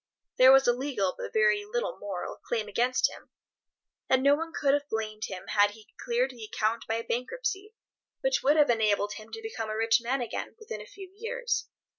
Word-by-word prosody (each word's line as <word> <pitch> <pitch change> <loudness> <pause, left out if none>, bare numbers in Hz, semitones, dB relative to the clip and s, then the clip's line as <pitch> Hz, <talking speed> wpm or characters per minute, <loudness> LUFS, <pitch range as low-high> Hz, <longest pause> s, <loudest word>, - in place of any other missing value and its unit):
There 260 +1 +9
was 270 0 +7
a 240 - +5
legal, 245 -8 -1
but - - -6
very 210 -1 +3
little 235 +4 -3
moral, 195 -3 -5
claim 225 -3 -3
against 245 +5 +2
him, - - -12 0.8
and 260 0 +4
no 280 +1 +6
one 325 +3 -2
could 280 -4 +2
have 290 0 0
blamed 215 -1 -3
him 185 -1 -7
had 205 -1 +4
he 215 +1 -16
cleared 245 +3 +1
the 240 -3 -11
account 220 +1 -1
by 225 - 0
a 230 - -2
bankruptcy, 390 - -3 0.5
which - - +1
would 290 +3 +4
have 295 -4 +5
enabled 210 -2 +1
him 215 0 -11
to 450 - -7
become 225 - -4
a 215 - -3
rich 225 +1 +3
man 255 +3 -1
again 240 - -4
within 425 - -7
a 210 - -11
few 385 -2 -12
years. 475 +2 -2
240 Hz, 205 wpm, -28 LUFS, 215-290 Hz, 0.8 s, There